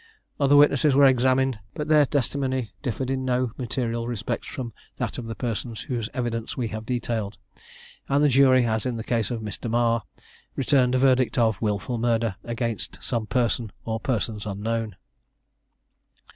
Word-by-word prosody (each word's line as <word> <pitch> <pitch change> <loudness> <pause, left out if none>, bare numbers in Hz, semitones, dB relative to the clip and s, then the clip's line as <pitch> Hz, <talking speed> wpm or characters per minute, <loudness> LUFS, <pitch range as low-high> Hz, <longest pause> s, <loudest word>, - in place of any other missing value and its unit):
Other 140 0 +4
witnesses 145 -1 +5
were 140 0 +7
examined, 130 -1 +3 0.2
but 150 - -3
their 150 -2 +5
testimony 130 -4 -1
differed 130 0 -2
in 130 0 -1
no 125 -1 0
material 120 -2 -2
respects 115 -3 -3
from 120 -4 -6 0.2
that - - -3
of 120 - -6
the 115 - -5
persons 115 0 -3
whose 120 -4 -3
evidence 115 -3 -3
we 120 -3 -1
have 110 0 -6
detailed; 115 -5 -2 0.7
and 140 +2 +3
the - - +6
jury, 130 -1 +5
as 110 +1 0
in 120 -2 -2
the 110 - -4
case 115 -3 0
of 120 -2 -3
Mr. 105 +2 -5
Marr, 115 0 +2 0.5
returned 130 -1 +3
a - - +4
verdict 130 -1 +3
of 110 -4 +2
"Wilful 110 +2 -1
Murder 115 -3 +1
against 115 -2 -3
some 115 -4 -2
person 115 -1 0
or 110 0 -2
persons 110 -3 -2
unknown." 110 +1 -2
120 Hz, 160 wpm, -25 LUFS, 115-130 Hz, 0.7 s, were